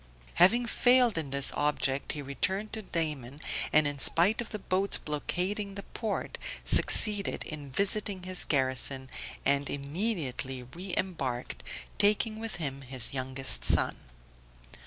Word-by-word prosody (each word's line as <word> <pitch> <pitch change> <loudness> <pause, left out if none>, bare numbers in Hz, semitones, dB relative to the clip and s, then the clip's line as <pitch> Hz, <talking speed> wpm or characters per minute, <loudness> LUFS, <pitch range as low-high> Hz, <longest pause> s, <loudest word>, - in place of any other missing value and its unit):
Having 235 +7 +5
failed 245 0 +4
in 160 -4 -3
this 140 0 +5
object 140 -2 -1
he 145 -1 -6
returned 190 +10 -2
to 220 - -5
Daman, 150 - -4 0.3
and 155 0 +4
in 145 -1 -3
spite 185 - +5
of 235 - -8
the 210 - -5
boats 190 0 0
blockading 190 +7 -3
the 200 - -7
port, 220 -3 -5 0.3
succeeded 205 -2 +2
in 150 -3 -7
visiting 200 +4 +1
his 185 0 +4
garrison, 130 -1 0 0.3
and 140 0 +2
immediately 140 - -3
re 175 +10 -9
embarked, 130 - -4 0.4
taking 215 +2 +2
with 225 -1 -5
him 140 -5 -4
his 130 -2 -2
youngest 130 0 0
son. - - +3
160 Hz, 135 wpm, -29 LUFS, 135-200 Hz, 0.4 s, Having